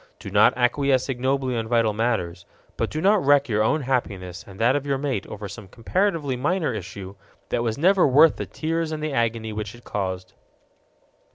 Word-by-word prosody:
Do - - -9
not - - +4
acquiesce 130 +2 +1
ignobly 130 0 -1
on 115 -1 -2
vital 115 -2 +2
matters. 105 -6 -2 0.3
But - - -1
do 155 - -4
not 200 +2 +3
wreck 145 0 +4
your 110 -3 +1
own 150 +8 +2
happiness 100 -9 -3
and 95 -1 -12
that 120 +4 +3
of 145 - -1
your 140 -1 +1
mate 135 -7 -3
over 105 -1 -7
some 105 0 -10
comparatively 150 - -1
minor 155 +6 0
issue 95 -1 -7 0.4
that 120 - 0
was 115 -2 -1
never 185 +4 +4
worth 150 +4 +5
the - - -5
tears 165 0 -2
and 155 -1 -4
the 155 -2 -2
agony 115 -3 -1
which 105 +1 -5
it 120 - -16
caused. 95 -2 -4
125 Hz, 190 wpm, -24 LUFS, 105-145 Hz, 0.4 s, worth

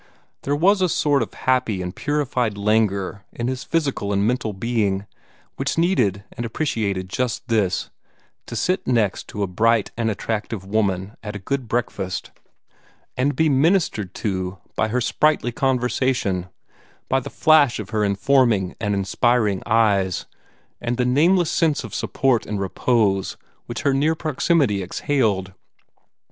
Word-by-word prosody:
There 145 - 0
was 190 +6 +3
a 185 - +3
sort 145 -3 +2
of 115 - -3
happy 130 -6 +1
and 90 0 -5
purified 125 -7 -1
languor 100 -2 0
in 120 - -4
his 130 0 -3
physical 140 -11 -1
and 100 0 +1
mental 120 -1 0
being, 100 -2 -1 0.5
which - - -1
needed 125 - +2
and 120 - -5
appreciated 110 -7 -2
just 120 +3 -2
this 105 -5 0 0.6
to - - -6
sit 180 - 0
next 115 -6 0
a 100 -1 0
bright 110 +4 +1
and 115 -1 0
attractive 105 -1 -3
woman 100 -1 -1
at 105 -1 -6
a 95 -2 -8
good 140 -3 -2
breakfast, 105 -5 -3 0.8
and 140 +3 +1
be 160 - +3
ministered 140 - +1
to 95 -2 -3 0.2
by 110 - +1
her 125 +3 0
sprightly 150 -1 +2
conversation, 125 -7 0 0.6
by 135 - +2
the 130 - -7
flash 155 -5 +4
of 105 -2 -7
her 110 -2 +1
informing 105 -1 +2
and 105 -2 0
inspiring 105 +1 +1
eyes, 105 -5 +2 0.6
and 120 0 -2
the 125 - +1
nameless 165 +7 +3
sense 160 -3 +1
of - - -8
support 130 -4 0
and 105 -2 -3
repose 100 0 +1 0.3
which 120 +4 -5
her 140 -2 +3
near 150 +4 +2
proximity 150 - +1
exhaled. 95 -2 0
115 Hz, 145 wpm, -22 LUFS, 100-135 Hz, 0.8 s, flash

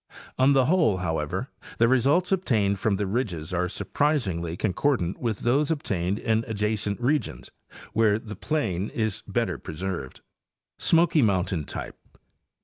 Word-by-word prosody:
On 135 +2 +5
the 135 -2 +4
whole, 160 - +3
how 80 -4 -1
ever, 75 -1 -4 0.3
the 115 - +4
results 140 +9 +3
obtained 110 - +1
from 105 0 +1
the 100 +1 -1
ridges 95 -7 -2
are 90 0 0
surprisingly 95 - -1
con 100 -1 0
cordant 105 -8 0
with 115 -5 -2
those 140 +5 +2
obtained 100 - -1
in 110 0 0
adjacent 105 -1 -1
regions 125 - -1 0.4
where 110 -2 +3
the 110 -1 -8
plain 105 - -1
is 110 -3 -2
better - - -1
preserved. 85 -4 -5 0.6
Smoky 165 -2 +4
Mountain 95 - +1
Type. - - -7
110 Hz, 140 wpm, -26 LUFS, 95-135 Hz, 0.6 s, On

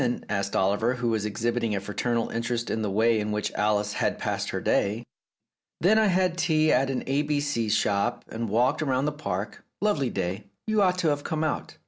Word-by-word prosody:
asked 100 -1 -1
Oliver, 105 +6 +2
who 120 -1 -1
was 110 -2 0
exhibiting 115 +1 -1
a - - 0
fraternal 115 +4 -1
interest 120 0 -2
in 110 - -1
the 105 - -1
way 110 +3 +3
in 105 0 -2
which 105 0 -1
Alice 105 0 0
had - - 0
passed - - -2
her - - -2
day. 105 +4 +1 0.8
"Then 215 +6 +4
I 220 - +4
had 185 -2 +1
tea 155 -2 +3
at 135 0 +2
an 130 - -2
A 135 +2 +1
B 150 -1 0
C 130 -7 -1
shop, 105 +3 +1
and 115 0 -4
walked 120 +8 +2
round 135 -1 +1
the - - +1
Park. 105 -9 -4 0.2
Lovely 175 -12 +1
day: 95 +1 -3 0.2
you 215 -1 +2
ought 185 -2 +3
to 170 -3 +2
have 145 -1 -1
come 160 0 -2
out." 155 - -3
120 Hz, 205 wpm, -26 LUFS, 105-150 Hz, 0.8 s, Then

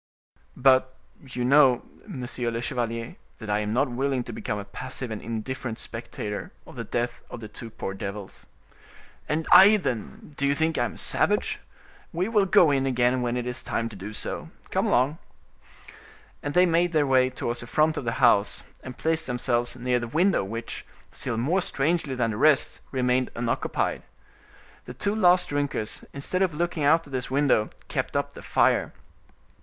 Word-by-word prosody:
"But 130 0 +4 0.3
you 125 -2 -4
know, 135 -2 +5 0.2
monsieur 125 - -4
le 115 0 -3
chevalier, 115 -2 -3 0.2
that 110 -2 -5
I 105 - +2
am 105 0 -2
not 135 +6 +2
willing 130 0 0
to 120 - -8
become 105 - -3
a 100 - -6
passive 125 +3 -6
and 110 - -4
indifferent 115 +1 -4
spectator 115 -3 -6
of - - -13
the - - -4
death 120 0 -3
of - - -7
the 110 - -7
two 110 +2 -9
poor 95 -3 -5
devils." 100 0 -7 0.8
"And 160 +1 0
I, 205 +3 +9
then—do 140 - -3
you 140 - +2
think 160 +2 +1
I 120 - +2
am - - -5
a - - -13
savage? - - +1 0.5
We 180 +3 -1
will 210 -4 +3
go 170 -4 +6
in 135 -1 +1
again, 125 0 +2
when 120 0 -1
it 120 - -2
is 125 0 -4
time 115 0 -2
to 110 - -11
do 100 +2 -7
so. 105 - -5 0.2
Come - - +1
along!" 135 +6 +2 1.2
And 145 +2 -4
they 180 +1 +6
made 170 0 +2
their 150 -2 +3
way 130 -1 +4
towards 120 -2 -3
the 120 - -7
front 155 +4 +2
of - - -3
the 115 -1 -1
house, 115 -5 +3 0.2
and 130 -2 -9
placed 160 0 0
themselves 120 -1 0
near 125 0 0
the 120 - -4
window 170 - +2
which, 115 +4 -6 0.3
still 115 - -3
more 160 +12 +1
strangely 150 -3 0
than 115 -3 0
the 105 - -4
rest, 150 +2 +3
remained 125 -1 +1
unoccupied. 115 0 -1 0.8
The - - -9
two 200 0 -1
last 180 -4 +4
drinkers, 145 -7 -2
instead 140 +7 -2
of 180 -5 +1
looking 170 -1 -1
out 160 +3 +4
at 140 - -13
this 125 -1 -2
window, 135 -5 +2 0.2
kept - - -2
up - - -2
the - - -10
fire. - - +2
130 Hz, 180 wpm, -26 LUFS, 115-150 Hz, 1.2 s, I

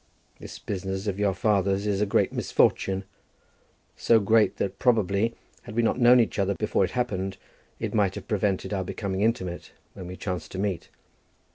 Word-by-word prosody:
This - - -9
business 95 0 -4
of 100 -1 -2
your 100 -2 +1
father's 100 -2 +1
is 100 -1 0
a 105 - +2
great - - +1
misfortune, 95 0 +1 0.9
so 115 - +4
great 110 +1 +3
that, 95 0 -3
probably, 110 -2 +2 0.3
had - - -10
we 120 - +2
not 115 - +1
known 125 +1 +7
each 115 - 0
other 100 0 +1
before - - 0
it - - 0
happened, 95 -6 -2 0.4
it - - -3
might 100 -3 +2
have - - -8
prevented 105 -2 -1
our 95 -1 -1
becoming 95 +1 -4
intimate 105 -6 -2 0.2
when 90 - -9
we 90 - -7
chanced 90 -4 -5
to - - -5
meet. 95 -2 -2
100 Hz, 175 wpm, -26 LUFS, 95-110 Hz, 0.9 s, known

